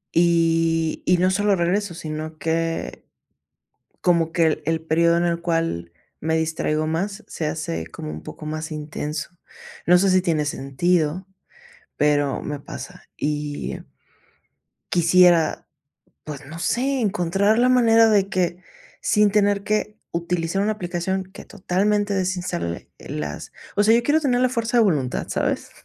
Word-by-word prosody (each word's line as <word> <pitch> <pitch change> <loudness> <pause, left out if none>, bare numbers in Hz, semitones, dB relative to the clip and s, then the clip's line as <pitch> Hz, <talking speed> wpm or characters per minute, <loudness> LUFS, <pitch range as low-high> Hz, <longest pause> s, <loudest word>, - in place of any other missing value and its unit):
Y 165 -1 +2
y 180 0 +5
no 185 +1 +3
solo 205 +1 +2
regreso, 180 +2 0
sino 155 -1 -6
que, 165 +1 -2 1.0
como 170 -2 +2
que 165 -1 +3
el 155 - -1
el 160 +1 0
período 170 +1 +3
en 170 - +1
el 170 -1 0
cual 165 - -2 0.3
me 160 +1 0
distraigo 155 -1 -1
más 195 +6 -2
se 160 - -5
hace 85 - -3
como 75 - -8
un 75 - -7
poco 155 - -10
más 155 +1 -4
intenso. 150 0 -4 0.6
No 180 +1 +6
sé 195 +2 +3
si 185 0 +4
tiene 165 -4 +1
sentido, 155 +5 0 0.7
pero 145 -2 +1
me 150 -1 -4
pasa. 140 - -9
Y 145 0 -3 1.1
quisiera, 175 -1 +4 0.6
pues, 150 -2 -8
no 160 +4 -8
sé, 265 +7 0
encontrar 200 +1 +1
la 250 +1 +4
manera 230 -3 +5
de 200 -2 +3
que 180 -3 0 0.4
sin 210 -2 +3
tener 205 -1 +2
que 210 0 -1 0.2
utilizar 170 +2 -1
una 215 - +1
aplicación 190 -1 -2
que 190 - -12
totalmente 205 +1 0
desinstale 180 - -2
las 75 -1 -6 0.2
o 205 - +3
sea, 215 +2 +5
yo 235 - +3
quiero 305 +2 +3
tener 250 -5 +1
la 255 - +4
fuerza 235 -1 -1
de 230 - +6
voluntad, 140 -10 0
¿sabes? - - -1
170 Hz, 145 wpm, -23 LUFS, 155-200 Hz, 1.1 s, No